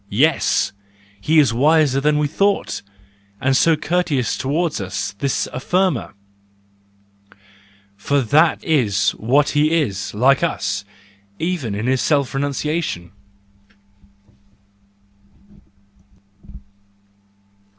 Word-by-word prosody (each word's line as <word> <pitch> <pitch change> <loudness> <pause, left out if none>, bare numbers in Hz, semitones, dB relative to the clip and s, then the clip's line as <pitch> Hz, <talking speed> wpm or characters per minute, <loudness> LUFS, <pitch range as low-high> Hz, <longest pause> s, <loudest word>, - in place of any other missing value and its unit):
—Yes! 140 +3 +2 0.5
He 160 +9 +1
is 140 -7 +4
wiser 145 +1 +3
than 150 +1 +2
we 150 - +1
thought, 200 +7 0 0.6
and 130 +1 +1
so 165 +4 +4
courteous 155 -6 -1
towards 150 0 -2
us— 100 +1 -4
this 140 +1 -1
affirmer! 180 +8 -1 1.8
For 140 +8 0
that 155 +7 +2
is 120 -11 +1
what 140 +6 +1
he 155 +3 +2
is, 100 -10 -3
like 135 +5 +3
us, 100 -11 -2 0.5
even 160 - -3
in 105 +3 -4
his 130 0 +1
self 140 -4 +1
renunciation. 140 - -3
140 Hz, 90 wpm, -19 LUFS, 120-160 Hz, 1.8 s, is